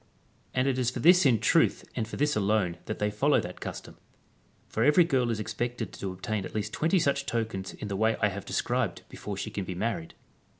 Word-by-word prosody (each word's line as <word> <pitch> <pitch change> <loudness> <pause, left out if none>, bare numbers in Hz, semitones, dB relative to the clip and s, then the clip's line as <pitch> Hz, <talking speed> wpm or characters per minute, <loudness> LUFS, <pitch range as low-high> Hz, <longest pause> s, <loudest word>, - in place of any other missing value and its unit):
And 130 +1 +2
it 130 -1 +1
is 125 -2 +2
for 125 - -5
this 175 +3 +6
in 120 -4 +4
truth - - +3
and 110 - -2
for - - -7
this 150 +1 +1
alone 100 -4 +1
that 110 - -4
they 105 0 0
follow 140 +8 +3
that 90 0 -8
custom; - - -7 0.7
for 110 - -1
every 150 +6 +6
girl 130 -7 +1
is 115 -2 -1
expected 120 +2 -3
to 95 - -4
obtain 95 +3 -3
at - - -8
least 105 0 -2
20 165 +5 +2
such 140 -4 +1
tokens 110 -6 -3
in 105 - -6
the 100 - -3
way 110 +3 +2
I 105 - +3
have 100 0 -6
described - - -1
before - - -6
she - - -4
can 100 - -3
be 90 -1 -5
married. 100 -4 -3
110 Hz, 220 wpm, -28 LUFS, 100-130 Hz, 0.7 s, this